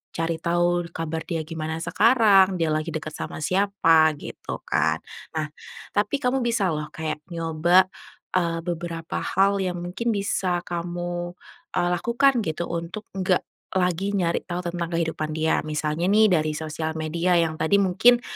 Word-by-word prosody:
cari 165 0 -1
tahu 175 +1 +1
kabar 160 0 -4
dia 165 -3 -2
gimana 160 0 -4
sekarang, 210 -5 +5
dia 165 -3 0
lagi 155 +1 -1
deket 155 0 -4
sama - - -6
siapa, 165 -4 +4
gitu - - -7
kan. - - +1 0.3
Nah 155 -1 -1 0.4
tapi 205 +6 +1
kamu 250 +2 +2
bisa 230 -5 +1
loh 150 -2 -2
kayak 155 -1 -4
nyoba, 170 +3 +3 0.5
eee, 170 -2 0
beberapa 170 -1 -4 0.2
hal 195 +1 +4
yang 180 -2 -2
mungkin 220 +7 -2
bisa 190 -3 0
kamu 175 0 -4 0.4
e 180 - +1
lakukan 235 +6 +2
gitu 160 +2 -3
untuk 170 +5 -5
nggak 185 -1 +2 0.3
lagi 185 +2 0
nyari 175 -4 0
tahu 175 0 -3
tentang 170 0 -2
kehidupan 160 -2 -1
dia 160 +1 +1
misalnya 155 +2 -1
nih 215 +2 +5
dari 155 -3 +2
sosial 155 +1 -3
media 165 +3 0
yang 165 -2 +2
tadi 200 +5 +3
mungkin 215 +6 +4
175 Hz, 150 wpm, -24 LUFS, 160-190 Hz, 0.5 s, sekarang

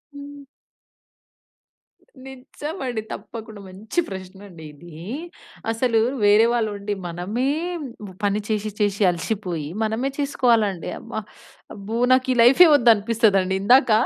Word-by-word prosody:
హ్మ్. 285 0 -10 1.8
నిజమండి. 265 - -6
తప్పకుండా 215 0 -8
మంచి 210 - -4
ప్రశ్నండి 190 -2 -10
ఇదీ. 160 +2 -14 0.8
అసలు 230 0 +1 0.3
వేరే 210 +2 +6
వాళ్ళు 225 -3 0
ఉండి 205 +1 -4
మనమే 190 +10 -3 0.8
పని 205 +1 +1
చేశి 215 -1 -2
చేశి 205 0 0
అలసిపోయి 175 -3 -4 0.2
మనమే 225 +5 -1
చేసుకోవాలండి. 230 - +1
అమ్మ! 230 - -13 0.6
అబ్బో! 210 +3 -5
నాకు 255 0 +3
ఈ - - -4
లైఫే 270 +10 +7
వద్దు 245 -5 +5
అనిపిస్తదండి. 205 -3 +1
ఇందాక 245 +3 +5
220 Hz, 105 wpm, -22 LUFS, 195-245 Hz, 1.8 s, లైఫే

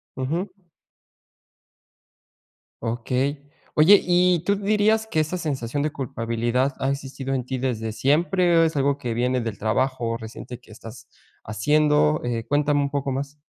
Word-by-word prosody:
Ujú. 155 +9 -2 2.3
Okey. 125 +5 -2 0.3
Oye, 185 +7 +7
¿y 180 -1 +3
tú 200 - +2
dirías 215 +2 +2
que 160 - -1
esa 155 +4 -2
sensación 140 -5 -3
de 155 - -1
culpabilidad 120 0 -1
ha 135 - 0
existido 135 -1 -4
en 130 -2 -2
ti 130 0 -3
desde 115 -4 -2
siempre 170 - +2
o 165 - +6
es 160 -1 0
algo 140 0 +1
que 120 -4 -4
viene 125 +2 0
del 115 -3 -4
trabajo 115 +1 -1
reciente 115 +1 -9
que 120 - -19
estás 110 0 -12 0.4
haciendo?, 150 +7 +2
eh, 115 -2 -2
cuéntame 145 0 +2
un 140 - -1
poco 140 -1 -2
más. 140 +2 -4
135 Hz, 145 wpm, -23 LUFS, 120-155 Hz, 2.3 s, Oye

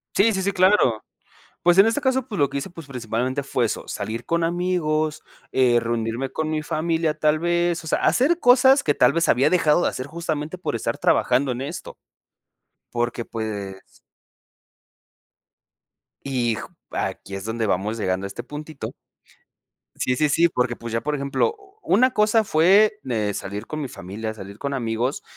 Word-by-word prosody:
Sí, 220 +3 +4
sí, 190 - -1
sí, 200 +1 0
claro. 185 - +3 0.6
Pues, 175 +1 +4
en 195 - +8
este 225 +6 +1
caso, 265 -2 0
pues, 205 -6 -5
lo 140 - +3
que - - -3
hice, 140 - -5
pues, 165 -3 -11
principalmente 125 +1 -2
fue 130 -2 0
eso, - - -4
salir 110 +3 -4
con 170 +5 0
amigos, 165 -3 0 0.3
eh, 125 -2 +4
reunirme 115 +2 -2
con 160 0 -2
mi 155 -1 -1
familia 160 +1 0
tal 155 0 +2
vez, 175 0 +1
o - - -10
sea, - - +1
hacer 310 +7 +3
cosas 260 0 +6
que 145 - +2
tal 125 0 +4
vez 170 +3 +1
había 135 +5 +4
dejado 175 -2 +3
de - - +2
hacer, 130 - -5
justamente 160 +1 -4
por 180 -9 -3
estar - - -3
trabajando 130 +1 +2
en 120 - -5
esto. 145 +6 -7 0.9
Porque, 120 0 -2
pues 100 -4 -6 2.3
Y 125 -4 0
ju - - -7 0.2
aquí 95 - -4
es 95 0 -6
donde 115 0 -2
vamos 105 +4 -1
llegando 95 -2 -1
a - - -2
este 100 - -7
puntito. 150 0 -7 1.0
Sí, 130 - 0
sí, 150 +2 +2
sí, 165 +4 +4
porque 125 -6 -1
pues, 115 -1 -7
ya 115 - 0
por 150 0 -1
ejemplo, 140 - 0
u 400 0 -22
u - - +2
una 255 +6 +5
cosa 220 -1 +3
fue, 205 +5 +4
de 110 -5 -1
salir 100 +3 -5
con 155 - -5
mi 140 - -3
familia, 110 +1 -6
salir 100 -1 -10
con 140 0 -3
amigos, 120 +1 -2
145 Hz, 180 wpm, -23 LUFS, 115-175 Hz, 2.3 s, en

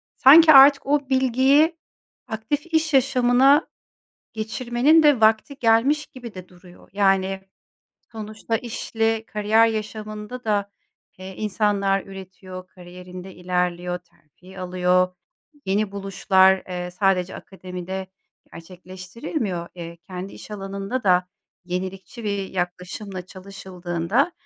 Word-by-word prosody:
sanki 315 +4 +8
artık 275 +1 +8
o 285 -1 0
bilgiyi 265 +5 +3 0.5
aktif 225 +8 -3
iş 320 -1 +1
yaşamına 260 +3 +4 0.7
geçirmenin 240 +7 +2
de 290 -6 +4
vakti 220 +6 +2
gelmiş 245 +6 +2
gibi 240 -4 -11
de 185 -1 -10
duruyor. 180 0 -18
Yani, 195 -1 +1 0.7
sonuçta 220 +1 -4
işle 225 -1 -2
kariyer 215 +2 +3
yaşamında 215 +2 -5
da, 205 -2 -1 0.5
eee, 190 0 -9
insanlar 200 -2 0
üretiyor, 185 -1 -10
kariyerinde 180 +1 -11
ilerliyor, 180 0 -2
terfi 175 +2 -19
alıyor. 180 0 +1 0.5
Yeni 200 +1 0
buluşlar, 190 -1 +2
eee, 180 0 -5
sadece 185 0 0
akademide 185 0 -7 0.5
gerçekleştirilmiyor. 185 - -6
Eee, 170 -1 -8
kendi 185 +1 -7
iş - - -12
alanında 200 +4 -5
da 180 -1 +3 0.4
yenilikçi 190 +5 -6
bir 200 -2 -2
yaklaşımla 180 +1 -5
çalışıldığında 185 - -3
195 Hz, 105 wpm, -22 LUFS, 185-230 Hz, 0.7 s, sanki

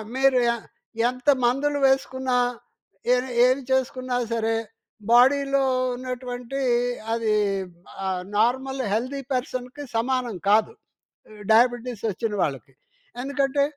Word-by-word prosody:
మీరు 265 0 +4 0.2
ఎ - - -2 0.5
ఎంత 250 +2 -9 0.2
మందులు 285 +4 +1
వేసుకున్న, 260 -1 0 0.8
ఎ - - +5 0.3
ఏమి 255 +2 +2
చేసుకున్నా 255 -1 0 0.2
సరే, 225 0 0 0.6
బాడీలో 275 +3 +4 0.3
ఉన్నటువంటి 250 +1 -5 0.5
అది 225 -2 0 0.7
ఆహ్, 185 -1 -2
నార్మల్ 260 +4 +1
హెల్డి 255 +6 -2
పర్సన్‌కి 255 +2 -4
సమానం 245 -2 -1
కాదు 215 - +3 0.8
డయాబిటిస్ 240 0 +2
వచ్చిన 220 +3 -3
వాళ్ళకి. 135 -2 -3 0.5
ఎందుకంటే 280 +1 0
255 Hz, 95 wpm, -24 LUFS, 230-270 Hz, 0.8 s, ఎ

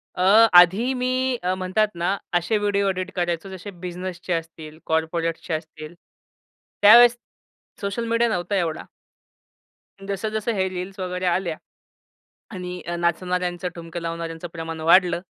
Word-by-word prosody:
अ, 205 +5 +6
आधी 190 +9 +6
मी 255 0 0
अ, 180 +1 +1
म्हणतात 185 +3 +1
ना 180 +4 -1 0.2
असे 175 +5 +1
व्हिडिओ 200 -1 +1
एडिट 185 0 -3
करायचो 175 +1 -2
जसे 190 +2 -8
बिझनेसचे 180 0 -5
असतील, 160 -2 -6
कॉर्पोरेट्सचे 160 +1 -2
असतील. 155 0 -6 0.9
त्यावेळेस 235 +3 +8 0.7
सोशल 200 +4 -3
मीडिया 230 0 +2
नव्हता 180 0 -2
एवढा. 170 -4 -1 1.2
अन् 195 - -11
जसं-जसं 215 +3 -2
हे 190 -2 0
रील्स 185 +2 -7
वगैरे 180 0 -3
आल्या. 175 -2 0 0.9
आणि 180 -3 -6 0.2
नाचणाऱ्यांचं, 180 +1 -1
ठुमके 170 0 -7
लावणाऱ्यांचं 165 0 -5
प्रमाण 165 -1 -6
वाढलं, 175 +2 +4
180 Hz, 125 wpm, -23 LUFS, 170-200 Hz, 1.2 s, त्यावेळेस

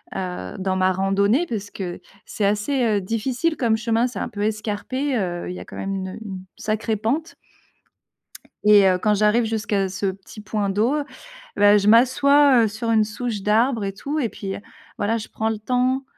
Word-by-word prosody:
heu, 180 - -5
dans 190 0 -1
ma 185 0 +3
randonnée. 200 - +2
Parce 205 -3 -4
que 180 -3 -5 0.3
c'est 205 - -2
assez, 210 +7 0
heu, 210 -3 +2
difficile 255 - -1
comme 230 -3 +2
chemin, 230 +2 +1
c'est 230 -5 -7
un - - -3
peu 205 -3 -6
escarpé, 220 +5 -2
heu, 175 -3 -3
il 180 - -5
y - - -7
a - - -9
quand - - -12
même 195 0 -3
une, 190 -1 -3
heu, - - -8
une 190 -3 -6 0.2
sacrée 220 +1 -2
pente. 285 +10 -2 1.3
Et 205 -2 +7
heu, 185 -1 +3
quand 210 +2 +1
j'arrive 210 +3 +3
jusqu'à 205 -3 -1
ce 195 +1 -2
petit 195 +3 -7
point 210 -1 -2
d'eau, 220 +9 +1 0.6
bah, 205 0 +6
je 200 - -1
m'assois, 260 +2 +5
heu, - - +1
sur 230 +2 -4
une 220 -1 +4
souche 220 -1 -4
d'arbre 225 +2 +2
et 195 - -2
tout, 285 +9 -4
et 240 -6 0
puis, 195 -2 -6
heu, - - -8 0.4
voilà, 215 +3 0
je 215 - -8
prends 220 0 -2
le 220 -1 -2
temps, 255 +4 0
215 Hz, 200 wpm, -22 LUFS, 200-235 Hz, 1.3 s, Et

